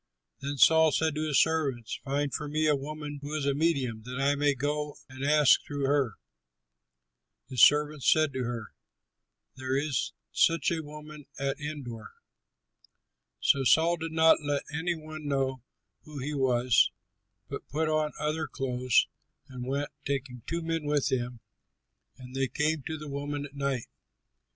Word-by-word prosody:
Then 140 +1 -4
Saul 160 +3 +6
said 160 +2 +1
to 155 +1 -2
his 145 -3 +3
servants, 140 -8 0
"Find 140 0 -1
for 150 +1 -3
me 155 +2 0
a 150 -1 +4
woman 145 +1 -6
who 145 +2 -5
is 150 -3 -1
a 140 - +2
medium, 140 -7 0
that 125 +2 -5
I 140 +1 +3
may 145 0 +2
go 145 +2 -2
and 130 0 -8
ask 150 0 +5
through 145 -1 -3
her." 135 -6 +1 1.3
His 125 -3 -1
servants 150 -1 +5
said 155 -2 +3
to 130 -1 -2
him, 115 -3 -5 0.9
"There 130 0 -1
is 140 -3 -1 0.2
such 165 +1 +3
a 165 -1 -1
woman 150 -1 -10
at 140 +1 -2
Endor." 135 -7 -6 1.3
So 135 - +3
Saul 165 +6 +4
did 165 0 -5
not 160 0 +5
let 145 -1 -1
any 170 +3 -1
one 155 -1 -8
know 135 -2 0 0.4
who 150 -1 -10
he 140 +3 -3
was, 125 -3 +3 0.6
but - - -7
put 160 +2 0
on 155 -1 +1
other 155 +1 -1
clothes 125 -2 +1 0.4
and 125 -1 -7
went, 140 +2 -2
taking 135 -3 -3
two 170 0 -2
men 165 -1 -1
with 145 -1 +1
him. 120 -2 -2 0.8
And 125 -1 -11
they 135 0 0
came 150 +3 0
to 160 - -3
the 150 0 -8
woman 145 +1 -4
at 140 - -12
night. 140 -4 -2
145 Hz, 160 wpm, -29 LUFS, 135-155 Hz, 1.3 s, Saul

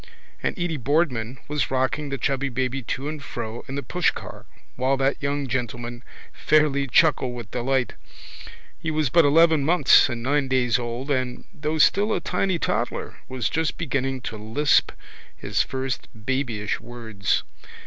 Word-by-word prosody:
And - - -2
Edy 175 -3 -1
Boardman 130 -3 0
was 145 -3 -1
rocking 135 +3 0
the 140 - -2
chubby 135 +2 0
baby 130 +1 -1
to 135 +4 -4
and 150 -2 -5
fro 115 -2 -6
in 135 - -5
the 140 - -3
pushcar 180 -1 -2 0.3
while 130 +2 +1
that 135 +3 0
young 140 0 -1
gentleman 120 -1 -4 0.3
fairly 140 +2 +2
chuckled 130 -2 +3
with 115 -2 -8
delight. 125 -1 0 0.9
He 160 - -3
was 155 -4 0
but 170 +1 +6
eleven 160 0 +5
months 155 -3 +5
and 120 -2 -4
nine 140 +1 +1
days 130 -2 +2
old 120 +4 -4
and, 130 -2 -1
though 155 -2 -2
still 205 +7 +4
a - - 0
tiny 190 -2 0
toddler, - - -2
was 130 -4 -1
just 160 -1 -1
beginning 135 -5 -1
to 115 - -5
lisp 115 +8 +2 0.5
his - - 0
first 130 -1 -3
babyish 110 -2 -2
words. 110 -4 -2
135 Hz, 155 wpm, -24 LUFS, 120-150 Hz, 0.9 s, but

